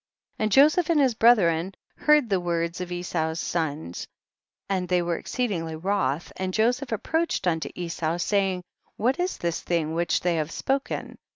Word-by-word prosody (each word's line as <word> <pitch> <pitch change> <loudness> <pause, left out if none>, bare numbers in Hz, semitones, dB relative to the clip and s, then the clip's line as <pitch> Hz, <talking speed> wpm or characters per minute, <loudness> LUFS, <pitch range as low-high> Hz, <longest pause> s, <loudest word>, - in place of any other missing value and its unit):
51. - - 0
And 215 - -1
Joseph 305 - +5
and 325 -3 +4
his 265 -4 +4
brethren 190 -6 +3 0.2
heard 300 -4 +4
the 195 -3 +1
words 170 0 -2
of 180 -1 -5
Esau's 170 -2 -2
sons, 155 - -3 0.6
and 185 -2 -1
they 180 -1 +2
were 170 0 -1
exceedingly 170 -9 -2
wroth, 165 -4 -1
and 185 0 -3
Joseph 245 +4 +1
approached 320 - -1
unto 165 -3 0
Esau, 170 -1 -2
say 195 +1 +1
ing, 180 0 -6 0.3
what 255 - +1
is 360 +1 -1
this 170 -1 -2
thing 160 -2 -1
which 170 +1 +1
they 175 -2 +1
have 155 -1 -1
spoken 270 +9 -3
180 Hz, 170 wpm, -25 LUFS, 170-230 Hz, 0.6 s, Joseph